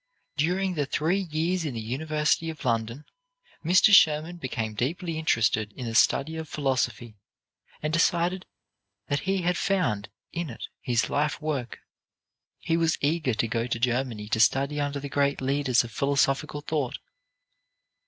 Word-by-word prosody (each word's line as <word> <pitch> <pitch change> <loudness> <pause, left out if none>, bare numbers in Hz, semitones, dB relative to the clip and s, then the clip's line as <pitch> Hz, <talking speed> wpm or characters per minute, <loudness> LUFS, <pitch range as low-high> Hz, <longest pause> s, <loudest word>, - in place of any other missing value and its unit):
During 180 +5 0
the 145 -4 -1
three 160 +7 +1
years 165 +3 0
in 145 -6 -3
the - - -3
University 150 +7 0
of 155 -4 -8
London, 115 +3 -1 0.6
Mr. 185 +5 +5
Schurman 160 -1 +5
became 115 -7 -3
deeply 160 - -2
interested 110 -7 +1
in 125 - -7
the 115 - -4
study 140 +6 +3
of 160 -2 -6
philosophy, 120 -6 -2 0.6
and 155 0 -1
decided 175 +2 +1 0.6
that 145 - +1
he 195 -2 +1
had 180 0 +1
found 180 - 0 0.2
in 170 -2 -3
it 115 - -8
his 120 -1 0
life 150 +1 0
work. 145 -6 -4 0.8
He 165 - -1
was 165 -1 +2
eager 145 -4 0
to 115 +1 0
go 115 +1 -1
to 115 - -1
Germany 120 -3 -1
to 110 - 0
study 135 +7 +2
under 145 0 -2
the 140 - -5
great 140 0 +1
leaders 135 -2 +2
of 115 - -9
philosophic 140 +3 +1 0.2
thought. 145 -6 -1
145 Hz, 155 wpm, -26 LUFS, 120-160 Hz, 0.8 s, Mr